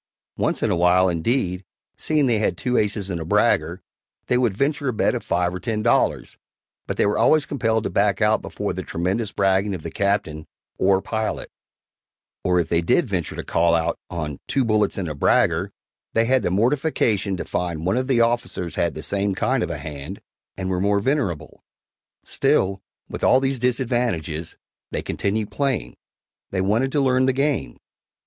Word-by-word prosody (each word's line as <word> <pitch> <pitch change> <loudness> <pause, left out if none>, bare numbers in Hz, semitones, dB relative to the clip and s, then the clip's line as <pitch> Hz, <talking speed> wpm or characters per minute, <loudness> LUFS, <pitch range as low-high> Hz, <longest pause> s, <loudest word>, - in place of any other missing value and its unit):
Once - - -1
in - - +2
a - - +2
while, 90 +2 +4
indeed, 90 +1 0 0.3
seeing 155 -2 +1
they 115 -4 +2
had 110 - 0
two 125 0 -1
aces 105 -3 0
and 85 -2 -3
a - - -2
bragger, 80 +3 +1 0.4
they 125 - +1
would 115 -6 +1
venture 145 +1 0
a 125 - 0
bet 105 - +1
of - - -2
five 90 0 0
or 90 - -4
ten 110 -1 -2
dollars, 120 - +1 0.5
but - - -3
they - - +3
were 100 - +1
always 155 -2 +4
compelled 110 -5 0
to - - -2
back 100 0 +2
out 110 0 +3
before - - -4
the - - -4
tremendous 95 +6 -2
bragging 95 0 +1
of 80 - -8
the - - -5
Captain 100 -6 -1 0.3
or 95 0 +3
pilot 110 -1 -3 0.9
or 90 -1 +2
if 85 - 0
they 85 0 +1
did 125 - +2
venture 90 -8 -3
to - - -5
"call 85 0 +2
out" 80 -1 0
on 75 -5 -4
"two 135 -2 +1
bullits 105 -2 +1
and 95 -3 -2
a 75 - -3
bragger," 70 - +2 0.4
they 115 0 +3
had 130 +2 +3
the - - 0
mortification 110 - +1
to - - -5
find 85 -2 -3
one 95 - +1
of 130 +1 -1
the 125 -4 +3
officers 115 -7 -1
had - - -1
the - - -6
same 100 -1 -1
kind 130 +5 0
of 90 - -1
a 85 - -3
hand, 75 +5 -7 0.4
and 95 -1 -3
were 90 -1 0
more 100 +1 +2
venerable! 105 - -2 0.6
Still, 95 0 +1 0.3
with - - -7
all 130 - +5
these 135 -1 -1
disadvantages, 120 - -1 0.3
they - - -3
continued 105 +1 -2
playing 140 -4 -1 0.5
they 95 - -2
wanted 110 +8 +1
to 145 - +2
learn 130 -1 +3
the 130 - +3
game. 135 - -1
100 Hz, 190 wpm, -22 LUFS, 90-125 Hz, 0.9 s, all